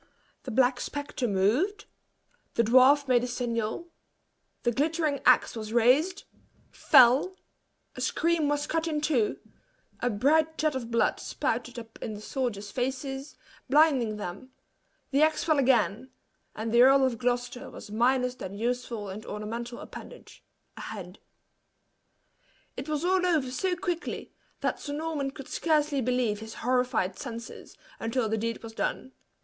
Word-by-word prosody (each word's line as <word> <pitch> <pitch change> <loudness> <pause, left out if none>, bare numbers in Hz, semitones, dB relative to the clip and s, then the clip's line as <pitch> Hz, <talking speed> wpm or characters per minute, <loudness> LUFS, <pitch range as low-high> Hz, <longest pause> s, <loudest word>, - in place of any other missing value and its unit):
The - - -5
black 250 +1 +2
spectre 285 -3 -3
moved 240 - +1 0.7
the 235 - +3
dwarf 260 +5 +5
made 245 -2 +3
a - - -1
signal 240 +5 -3 0.7
the 240 - +2
glittering 305 +2 0
axe - - +5
was 215 -1 -6
raised 275 - +3 0.5
fell 270 +6 +5 0.6
a - - -6
scream 335 -3 +1
was 290 0 0
cut 325 +1 -1
in 305 -2 -1
two 290 -8 +1 0.6
a 245 - 0
bright 305 +8 +2
jet 310 -1 +1
of 250 -3 -4
blood 230 0 +1
spouted 245 +2 -3
up 225 -1 -10
in 215 - -4
the - - -8
soldiers 215 -3 -3
faces, 270 +2 -3 0.3
blinding 270 -7 +4
them; 205 +6 -7 0.6
the 280 +2 +3
axe 310 0 +3
fell 310 -3 +2
again, 255 -2 +2 0.5
and 220 +1 -3
the 235 +1 +5
Earl 270 +1 +6
of 240 -4 -1
Gloucester 245 0 -2
was 205 - -11
minus 250 +3 +2
that 195 -6 -8
useful 235 -1 -3
and 200 +3 -7
ornamental 230 +3 -5
appendage, - - -11 0.3
a - - -7
head. 190 -3 -8 1.6
It 285 - -6
was 305 +2 -1
all 370 0 +2
over 310 -8 +1
so 365 +7 -1
quickly, 350 -1 -4 0.3
that - - -1
Sir 285 - -5
Norman 305 -2 -2
could 275 0 -10
scarcely 300 -3 +1
believe 245 -4 0
his 220 0 -9
horrified 250 -7 +1
senses, 235 -3 -8 0.2
until 225 +1 -1
the 220 +1 -1
deed 230 +1 -3
was 225 -1 -8
done. 260 - -3
255 Hz, 145 wpm, -28 LUFS, 230-290 Hz, 1.6 s, Earl